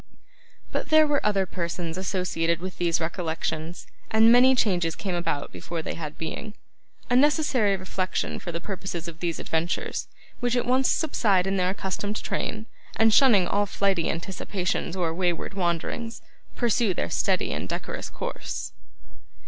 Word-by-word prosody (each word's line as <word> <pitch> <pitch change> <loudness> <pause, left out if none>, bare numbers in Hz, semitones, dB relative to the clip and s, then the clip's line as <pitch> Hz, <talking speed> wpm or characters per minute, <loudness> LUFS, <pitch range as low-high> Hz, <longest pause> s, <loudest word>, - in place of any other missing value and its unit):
But - - -2
there 310 0 +7
were 295 -1 +1
other 200 -2 +2
persons 170 -2 -3
associated 180 -3 0
with 185 +1 -7
these 170 -2 +2
recollections, 160 0 -3 0.2
and 220 +1 +6
many 255 +2 +7
changes 175 -9 +1
came 190 -3 -3
about 165 -4 -2
before 165 -2 -5
they - - -3
had 155 -2 -6
being. 210 +6 -5 0.6
A - - +4
necessary 265 -7 +4
reflection 185 0 -2
for 175 - -5
the 170 - -3
purposes 180 -2 -5
of 165 -1 -8
these 170 -1 -1
adventures, 165 +2 -2 0.3
which 245 0 +1
at 245 - +1
once 255 +2 +3
subside 205 - +2
into 195 0 0
their 180 0 +2
accustomed 200 +2 -2
train, 215 0 -2 0.3
and 225 -1 +4
shunning 220 -9 +6
all 205 0 +1
flighty 195 -4 +1
anticipations 180 0 -2
or 170 -3 0
wayward 175 +1 -1
wanderings, 195 +6 -2 0.3
pursue 235 -5 +2
their 85 - -2
steady - - +1
and - - -4
decorous - - -4
course. - - -5
185 Hz, 150 wpm, -26 LUFS, 170-220 Hz, 0.6 s, there